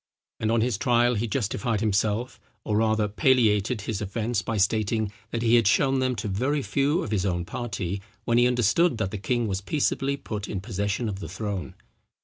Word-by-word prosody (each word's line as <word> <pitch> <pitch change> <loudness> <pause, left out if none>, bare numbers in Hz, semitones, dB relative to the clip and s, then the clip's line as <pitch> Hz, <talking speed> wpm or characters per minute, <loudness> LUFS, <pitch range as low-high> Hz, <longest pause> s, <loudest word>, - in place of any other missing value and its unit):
And 110 - 0
on 115 -1 +3
his 115 -3 0
trial, 120 +2 +3
he 115 +1 -1
justified 115 0 -1
himself, 110 +3 0 0.2
or 105 -1 0
rather 110 -1 +2
palliated 110 -2 +2
his 105 -1 -3
offence, 105 +2 -1
by 110 +4 -3
stating, 110 +1 +1 0.2
that 115 0 -3
he 115 0 +3
had 115 -4 +3
shown 135 +5 +3
them 130 -1 0
to 110 0 -4
very 130 +9 0
few 145 +8 +1
of - - -5
his 100 -4 +1
own 90 -3 -1
party, 100 -3 -4 0.2
when 120 0 +3
he 120 - +5
understood 125 - +2
that 100 -3 -2
the 105 - -4
king 120 +3 0
was 95 -1 -2
peaceably 140 +2 0
put 105 -6 -5
in 100 - -3
possession 100 +4 -2
of 100 -2 -4
the 85 - -7
throne. 100 0 -4
110 Hz, 195 wpm, -26 LUFS, 100-120 Hz, 0.2 s, he